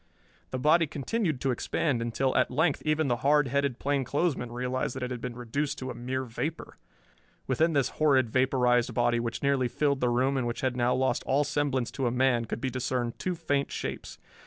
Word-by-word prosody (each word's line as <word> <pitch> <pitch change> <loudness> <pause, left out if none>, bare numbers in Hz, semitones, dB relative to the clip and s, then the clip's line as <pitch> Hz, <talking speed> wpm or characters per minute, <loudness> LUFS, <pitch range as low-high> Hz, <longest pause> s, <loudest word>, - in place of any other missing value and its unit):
The 130 - -3
body 155 +5 +4
continued 155 - -2
to 135 - +1
expand 125 +1 -1
until 125 +3 0
at 130 - +3
length 155 +4 +1
even 155 0 +1
the 120 -2 +1
hard 140 +1 +3
headed 140 -2 0
plainclothesman 140 -1 -1
realized 125 +1 -2
that 130 - -4
it 125 - -3
had 125 -2 -4
been 125 -2 -5
reduced 125 +5 -2
to 130 0 -5
a - - -5
mere 130 +2 -3
vapor. 150 +7 -5 0.7
Within 160 +6 +2
this 140 -3 +2
horrid 135 -6 +4
vaporized 125 -2 +2
body, 120 0 +2
which 115 -1 -4
nearly 140 -2 +2
filled 140 +2 0
the 125 - +2
room 130 +3 +1
and 125 -2 0
which 120 - -4
had 130 -2 0
now 125 0 +2
lost 130 0 +1
all 140 +2 +3
semblance 145 -4 -1
to 135 -2 -1
a - - 0
man, 125 -2 +2
could - - -4
be 130 - -1
discerned 125 -1 -2
two 185 -1 -2
faint 140 -4 -1
shapes. - - -5
130 Hz, 205 wpm, -28 LUFS, 120-140 Hz, 0.7 s, body